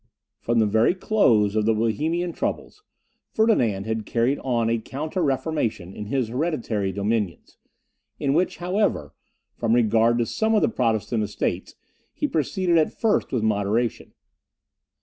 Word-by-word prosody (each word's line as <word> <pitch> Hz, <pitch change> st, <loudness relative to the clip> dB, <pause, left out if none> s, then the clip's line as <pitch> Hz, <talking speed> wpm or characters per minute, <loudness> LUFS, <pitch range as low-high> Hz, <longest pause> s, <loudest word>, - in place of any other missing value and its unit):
From 120 Hz, 0 st, -1 dB
the 110 Hz, -, +4 dB
very 110 Hz, -, +3 dB
close 115 Hz, -, +2 dB
of 110 Hz, 0 st, +1 dB
the 110 Hz, -, +3 dB
Bohemian 160 Hz, -, -1 dB
troubles, 420 Hz, -, -4 dB, 0.5 s
Ferdinand 120 Hz, -, +1 dB
had 110 Hz, 0 st, -2 dB
carried 120 Hz, +4 st, +1 dB
on 120 Hz, -3 st, 0 dB
a 115 Hz, 0 st, +1 dB
counter 155 Hz, -, -4 dB
reformation 135 Hz, -, -1 dB
in 105 Hz, 0 st, -7 dB
his 125 Hz, -1 st, -1 dB
hereditary 120 Hz, -, -1 dB
dominions, 100 Hz, -1 st, -3 dB, 0.6 s
in 135 Hz, -, +1 dB
which, 175 Hz, +4 st, +1 dB
however, 180 Hz, -, -1 dB, 0.4 s
from 115 Hz, 0 st, +1 dB
regard 115 Hz, 0 st, +3 dB
to 120 Hz, -, +1 dB
some 220 Hz, -, 0 dB
of 210 Hz, -, +3 dB
the -, -, +3 dB
Protestant 115 Hz, -, 0 dB
Estates, 105 Hz, 0 st, -3 dB, 0.4 s
he -, -, -1 dB
proceeded, 170 Hz, +3 st, +1 dB
at 155 Hz, -, -1 dB
first, 225 Hz, -2 st, +1 dB
with 125 Hz, -4 st, -1 dB
moderation. 110 Hz, +2 st, -1 dB
115 Hz, 145 wpm, -24 LUFS, 110-160 Hz, 0.6 s, the